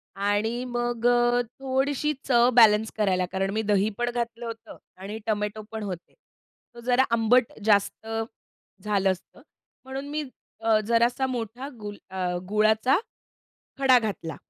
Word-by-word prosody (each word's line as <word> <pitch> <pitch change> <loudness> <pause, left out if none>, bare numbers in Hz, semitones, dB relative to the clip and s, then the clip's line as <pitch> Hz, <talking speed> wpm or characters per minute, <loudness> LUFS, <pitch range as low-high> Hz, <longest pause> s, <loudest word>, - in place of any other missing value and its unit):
आणि 205 +4 0
मग 240 -1 -2
अ, 240 0 +3 0.2
थोडीशी 270 +3 0
चव 240 -1 +5
बॅलन्स 220 0 +5
करायला, 185 -3 +2
कारण 195 0 -1
मी 220 - 0
दही 205 +1 +3
पण 240 0 0
घातलं 235 0 -3
होतं 230 -1 -8 0.2
आणि 205 +3 -6
टोमॅटो 210 0 -1
पण 220 -1 -5
होते. 180 -4 -7 0.6
तो 240 - -12
जरा 250 +1 +5
आंबट 230 +1 +3
जास्त 210 +1 +2 0.8
झालं 195 -2 +2
असतं. 185 - -9 0.4
म्हणून 270 +2 -6
मी 300 +1 -2 0.4
अ, 220 -1 +4
जरासा 235 +3 +2
मोठा 245 +1 -4
गुल 205 -1 -7
अ, 190 -1 -3 0.2
गुळाचा 215 +6 +3 0.8
खडा 260 -2 +6
घातला. 200 -8 -4
225 Hz, 135 wpm, -26 LUFS, 210-245 Hz, 0.8 s, खडा